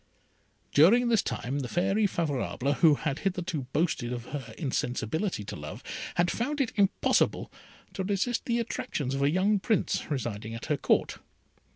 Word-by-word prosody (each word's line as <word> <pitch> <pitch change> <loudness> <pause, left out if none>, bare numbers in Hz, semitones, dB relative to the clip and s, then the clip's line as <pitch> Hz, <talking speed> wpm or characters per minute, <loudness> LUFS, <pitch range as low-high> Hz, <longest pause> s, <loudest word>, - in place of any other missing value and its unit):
During 230 +12 +6
this 225 -3 +4
time 135 +4 -3
the 130 - -3
Fairy 195 - +2
Favourable, 145 -5 -1
who 150 +1 +5
had 145 0 -2
hitherto 180 -7 -2
boasted 150 -6 0
of 120 -1 -4
her 140 -4 -6
insensibility 135 - -2
to - - -6
love, - - -8 0.3
had 175 0 +2
found 290 +6 -2
it 265 -4 0
impossible 200 -2 +2 0.4
to 190 - -3
resist 205 +5 -1
the 235 -1 +1
attractions 150 - -2
of 135 - -1
a 140 - +4
young 195 +5 +2
Prince 215 -1 0
residing 115 -6 -3
at 115 - -7
her 150 - 0
Court. - - +1
165 Hz, 160 wpm, -28 LUFS, 135-200 Hz, 0.4 s, During